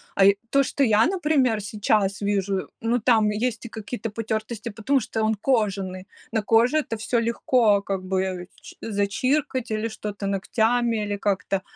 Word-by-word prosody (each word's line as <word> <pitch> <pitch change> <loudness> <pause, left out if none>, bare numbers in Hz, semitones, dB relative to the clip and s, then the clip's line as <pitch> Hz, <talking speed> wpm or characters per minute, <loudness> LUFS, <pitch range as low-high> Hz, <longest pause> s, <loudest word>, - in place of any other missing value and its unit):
а, 195 - +5
и 200 0 +5
то, 275 0 +4
что 275 +1 0
я, 220 -2 +4
например, 300 - +1
сейчас 205 -1 0
вижу, 200 -1 -1
ну, 235 +2 +1
там 220 -2 +3
есть 230 +2 -2
и 235 - -6
какие-то 225 +1 -5
потертости, 220 +1 -4
потому 230 +6 0
что 220 0 -3
он 220 0 +2
кожаный, 195 -5 -1 0.2
на 220 - 0
коже 230 +7 +3
это 275 -7 -1
всё 235 +2 0
легко 230 -2 +2
как 195 -1 -3
бы 185 -1 -2
чи - - -13
зачиркать 250 +5 -1
или 215 +1 -1
что-то 210 -2 -5
ногтями, 225 +3 +1
или 205 0 -3
как-то. 195 -1 -1
220 Hz, 165 wpm, -24 LUFS, 200-235 Hz, 0.2 s, а